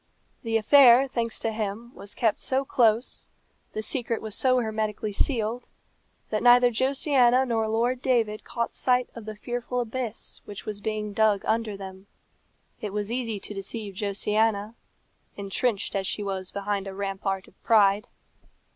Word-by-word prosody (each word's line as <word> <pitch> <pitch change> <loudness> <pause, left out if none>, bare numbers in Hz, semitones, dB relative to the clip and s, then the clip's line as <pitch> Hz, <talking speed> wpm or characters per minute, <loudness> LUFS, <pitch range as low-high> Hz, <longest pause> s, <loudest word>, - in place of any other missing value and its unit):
The 225 -1 0
affair, 255 +2 +7
thanks 230 -3 -2
to 225 - -1
him, 220 +2 -4
was 200 0 -6
kept 225 -3 +1
so 270 +1 0
close, 230 -2 +1 0.5
the 215 - -3
secret 235 -1 0
was 220 -1 -6
so 255 +2 +3
hermetically 215 -2 -2
sealed, 230 +1 -1 0.6
that 215 - 0
neither 245 0 +6
Josiana 260 0 +3
nor 225 -3 0
Lord 240 +3 0
David 230 -5 +1
caught 235 -1 -3
sight 250 -1 +1
of 230 -2 -9
the 215 0 -6
fearful 245 +3 -4
abyss 240 -1 -4
which 205 -1 -9
was 210 -1 -5
being 210 -1 -3
dug 210 -1 +2
under 220 -2 -1
them. 190 0 -10 0.7
It 205 -2 -5
was 210 +1 -3
easy 235 -4 -2
to - - -7
deceive 200 +1 -6
Josiana, 210 +2 0 0.6
entrenched 200 +2 -1
as 195 -1 -1
she 210 - -2
was 190 -2 -3
behind 200 0 -3
a 190 - -7
rampart 195 -1 -3
of - - -23
pride. 210 -2 +4
220 Hz, 155 wpm, -26 LUFS, 205-240 Hz, 0.7 s, affair